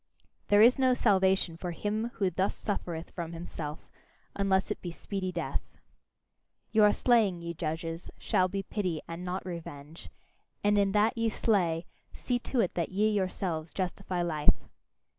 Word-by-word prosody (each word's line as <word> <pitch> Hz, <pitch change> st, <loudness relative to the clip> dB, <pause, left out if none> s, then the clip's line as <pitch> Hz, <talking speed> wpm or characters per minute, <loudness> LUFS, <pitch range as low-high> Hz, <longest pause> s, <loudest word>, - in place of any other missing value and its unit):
There 205 Hz, +1 st, +6 dB
is 250 Hz, +3 st, +6 dB
no 255 Hz, -1 st, +4 dB
salvation 190 Hz, -6 st, +3 dB
for 180 Hz, -, -4 dB
him 215 Hz, +6 st, -2 dB
who 190 Hz, -3 st, +1 dB
thus 190 Hz, +3 st, 0 dB
suffereth 170 Hz, -5 st, -4 dB
from 170 Hz, -2 st, -5 dB
himself, 165 Hz, -2 st, -6 dB, 0.5 s
unless 195 Hz, 0 st, +1 dB
it -, -, -3 dB
be 175 Hz, -, -4 dB
speedy 185 Hz, +2 st, -4 dB
death. 175 Hz, -1 st, -4 dB, 0.9 s
Your 210 Hz, -2 st, +6 dB
slaying, 205 Hz, -8 st, +3 dB
ye 170 Hz, 0 st, -4 dB
judges, 165 Hz, +1 st, -4 dB
shall 185 Hz, -, +2 dB
be 195 Hz, +1 st, -3 dB
pity, 185 Hz, -5 st, -2 dB
and 170 Hz, +1 st, -6 dB
not 180 Hz, +1 st, -3 dB
revenge; 160 Hz, -3 st, -8 dB, 0.5 s
and 205 Hz, 0 st, +4 dB
in 195 Hz, -1 st, +2 dB
that 210 Hz, +1 st, +3 dB
ye 230 Hz, -1 st, +1 dB
slay, 180 Hz, -7 st, +1 dB, 0.3 s
see 245 Hz, -1 st, -1 dB
to 245 Hz, 0 st, 0 dB
it 185 Hz, -, 0 dB
that 170 Hz, -2 st, -1 dB
ye 210 Hz, +3 st, +2 dB
yourselves 185 Hz, -5 st, -2 dB
justify 185 Hz, -1 st, -2 dB
life! 155 Hz, -3 st, +2 dB
185 Hz, 155 wpm, -30 LUFS, 170-205 Hz, 0.9 s, There